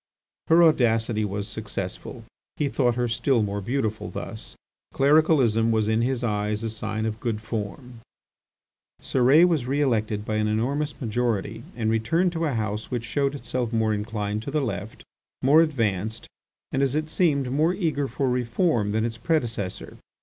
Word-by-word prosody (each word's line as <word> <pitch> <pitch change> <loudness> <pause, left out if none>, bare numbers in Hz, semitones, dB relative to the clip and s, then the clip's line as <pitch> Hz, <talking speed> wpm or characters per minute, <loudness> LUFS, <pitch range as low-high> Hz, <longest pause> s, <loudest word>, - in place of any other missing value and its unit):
Her 165 +1 +6
audacity 115 -7 +3
was 100 0 -3
successful. 110 +2 -6 0.3
He 145 -2 0
thought 125 -4 +1
her 120 0 0
still 120 0 +1
more 100 0 -3
beautiful 110 -1 -2
thus. - - -7 0.4
Clericalism 135 -6 +4
was 110 -2 +2
in 110 +1 +2
his 125 0 -1
eyes 105 -1 -1
a 115 - -2
sign 110 0 -3
of 110 0 -3
good 115 -3 -2
form. 115 +3 -6 1.0
Cérès 135 +7 +4
was 155 -8 0
re 140 +2 0
elected 110 -6 0
by 110 -1 -1
an 105 0 +1
enormous 140 +8 -1
majority 115 -2 -1
and 110 -2 0
returned 165 +12 +1
to 165 -1 -1
a 145 - 0
House 110 -1 -3
which 120 -2 -3
showed 140 +4 0
itself 125 -4 -3
more 110 -2 +1
inclined 105 0 -3
to 120 - -6
the 150 +2 0
Left, 110 -3 -5 0.4
more 145 +5 +6
advanced, 110 - -1 0.5
and, 135 - 0
as 135 0 +1
it 155 0 0
seemed, 145 -6 +1
more 155 +6 +2
eager 155 -7 0
for 135 0 -2
reform 125 - +1
than 110 +1 +1
its 115 -1 -4
predecessor. 115 - -2
115 Hz, 165 wpm, -25 LUFS, 110-140 Hz, 1.0 s, Her